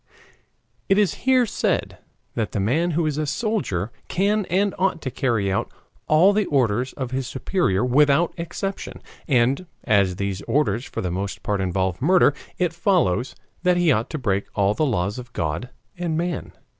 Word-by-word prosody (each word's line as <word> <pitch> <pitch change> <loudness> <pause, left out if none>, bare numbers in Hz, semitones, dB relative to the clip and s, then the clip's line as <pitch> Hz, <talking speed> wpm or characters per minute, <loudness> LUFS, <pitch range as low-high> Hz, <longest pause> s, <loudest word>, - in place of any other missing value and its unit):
It 195 - +4
is 205 -5 +3 0.2
here 255 -2 +5
said 215 - -1 0.3
that 110 -6 -2
the - - -1
man 140 - +1
who 170 - +2
is 150 -1 -1
a 155 - -1
soldier 165 - -1 0.2
can 205 +3 +1
and 195 +2 +1
ought 185 -3 +1
to 130 - -3
carry 115 -7 0
out 95 - -1 0.4
all 170 +6 +5
the 210 -1 +1
orders 125 -2 +1
of 130 -3 -5
his 130 -1 -2
superior 130 - 0
without 145 +5 +3
exception. 185 +3 -5 0.2
And 135 +6 +2 0.2
as 100 -6 +3
these 100 0 -3
orders 130 -5 +1
for - - -5
the 90 - -2
most 95 +2 -4
part 100 -2 -1
involve 95 +1 -1
murder, 175 -1 +5 0.2
it 175 -3 0
follows 165 - +1 0.3
that 180 0 +3
he 175 -3 +4
ought 115 -1 +1
to 155 - -4
break 100 -7 -1
all 100 0 +2
the 155 +6 +1
laws 105 -1 -1
of 125 0 -10
God 85 +10 -2 0.3
and 170 -3 -2
man. 175 0 -3
135 Hz, 175 wpm, -23 LUFS, -, 0.4 s, here